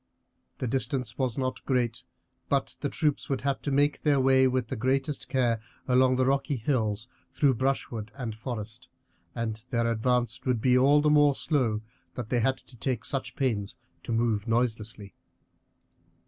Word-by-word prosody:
The - - -3
distance 125 +1 -2
was 130 -4 0
not 130 -1 -2
great, 125 -3 0 0.5
but - - 0
the - - -2
troops 150 -1 0
would 135 -2 -1
have 140 0 -1
to - - -3
make 145 +2 +2
their 145 -3 +3
way 130 0 +5
with 130 -2 -1
the - - -2
greatest 135 +4 -1
care 120 -4 +1 0.3
along 130 0 +4
the 130 0 +2
rocky 140 +2 +1
hills 110 -3 -1 0.2
through 140 -3 +3
brushwood 120 -3 -2
and 120 -5 -4
forest, 110 +1 -6 0.5
and 110 -2 -3
their 115 -1 +1
advance 120 +2 0
would 125 -3 +1
be 125 +2 +3
all 140 +3 +5
the 150 0 +3
more 145 -2 +5
slow 125 -10 0 0.3
that 120 -3 -5
they 125 - +2
had 130 +3 +2
to 130 - -18
take 120 -1 -2
such 135 -1 -3
pains 110 -7 -1 0.2
to - - -6
move 115 -2 +1
noiselessly. 115 -3 -1
125 Hz, 165 wpm, -28 LUFS, 115-135 Hz, 0.5 s, way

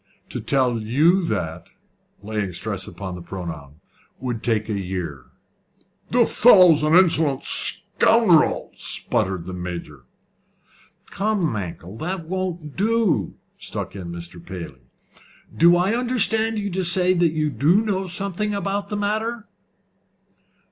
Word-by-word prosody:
To - - -4
tell 130 -4 +1
you 155 - +2
that," 85 - -4 0.5
laying 105 -2 -3
a - - -10
stress - - -3
upon 95 -2 -7
the 90 - -8
pronoun, 80 -6 -8 0.4
"would 120 -4 -4
take 110 -3 -1
a 110 - -3
year." 90 -8 -5 0.8
"The 240 -1 +3
fellow's 185 -11 +6
an 155 +2 +2
insolent 160 -6 +3
scoundrel," - - +4
spluttered 95 -3 -1
the 95 - -7
Major. 85 -7 -7 1.1
"Come, 205 -2 -1
Mankell, 95 0 -7
that 175 +1 -4
won't 175 -5 -4
do," 205 - 0 0.2
struck - - -5
in 90 -3 -7
Mr. 85 0 -9
Paley. 85 -9 -9 0.7
"Do 170 +1 +5
I 180 +4 +1
understand 225 -2 +1
you 205 -1 -3
to 190 +1 -2
say 180 +1 +3
that 170 -3 +1
you 155 -1 -1
do 145 - +3
know 195 -3 -2
something 200 +3 -2
about 200 0 -3
the 210 - -3
matter?" 215 +2 -2
160 Hz, 130 wpm, -22 LUFS, -, 1.1 s, fellow's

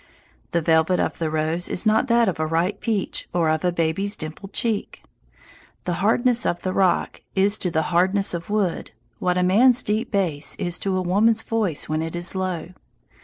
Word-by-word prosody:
The 170 - 0
velvet 160 +2 +3
of - - -1
the 160 -2 -1
rose 160 +3 -1
is 185 - 0
not 215 +4 +3
that 235 -1 +3
of 170 -4 -1
a 155 - +1
ripe 165 +5 0
peach 215 -5 -2
or 165 -2 +2
of 155 +2 -1
a 180 - +2
baby's 170 +5 0
dimpled 160 +6 -8
cheek. 220 0 -2 0.8
The 180 - -1
hardness 240 +3 +2
of 175 0 -1
the 185 - -1
rock 190 -2 +1
is 200 +2 +2
to 180 - -1
the 160 -1 0
hardness 190 +3 +2
of 170 +1 -5
wood 205 -5 -1 0.3
what 180 0 0
a 180 - +2
man's 235 +8 +4
deep 215 +3 -1
bass 170 -8 -1
is 175 0 -3
to 195 -1 -1
a 185 - -1
woman's 215 +5 +2
voice 215 -9 -1
when 155 +1 -1
it 165 +1 -4
is 175 0 -1
low. 185 -3 -3
185 Hz, 195 wpm, -23 LUFS, 165-210 Hz, 0.8 s, man's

